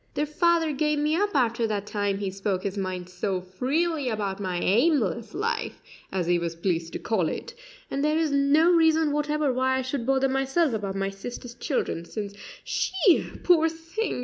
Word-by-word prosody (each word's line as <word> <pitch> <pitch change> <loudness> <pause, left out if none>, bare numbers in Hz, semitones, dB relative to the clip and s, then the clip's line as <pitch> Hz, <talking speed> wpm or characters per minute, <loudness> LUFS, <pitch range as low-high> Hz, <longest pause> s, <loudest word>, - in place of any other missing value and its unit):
Their 295 - +1
father 330 +1 +2
gave 300 +1 0
me 300 +2 +1
up 405 +1 0
after 235 -3 +2
that 205 -2 -2
time 205 -1 -1
he 195 -1 -3
spoke 195 -1 -2
his 200 -1 -2
mind 185 -2 -3
so 185 +1 -2
freely 270 - -1
about 205 -3 -2
my 185 -3 -2
aimless 230 - +1
life 455 +5 -2 0.3
as 185 -2 -1
he 175 0 +2
was 170 -1 -3
pleased 165 -1 -2
to - - -2
call 185 -8 0
it - - -6 0.4
and 275 - -1
there 305 +1 +2
is 320 -2 +1
no 280 +4 +4
reason 320 -2 +4
whatever 295 -1 0
why 260 +1 +1
I 260 - -1
should 260 -2 -3
bother 270 0 +3
myself 270 +3 +1
about 200 -3 -3
my 195 0 -1
sister's 240 +4 -8
children, 235 - -2
since 205 +1 -5 0.3
she, 375 -1 +2
poor 325 -2 +5
thing! 330 - -4
260 Hz, 185 wpm, -26 LUFS, 195-305 Hz, 0.4 s, poor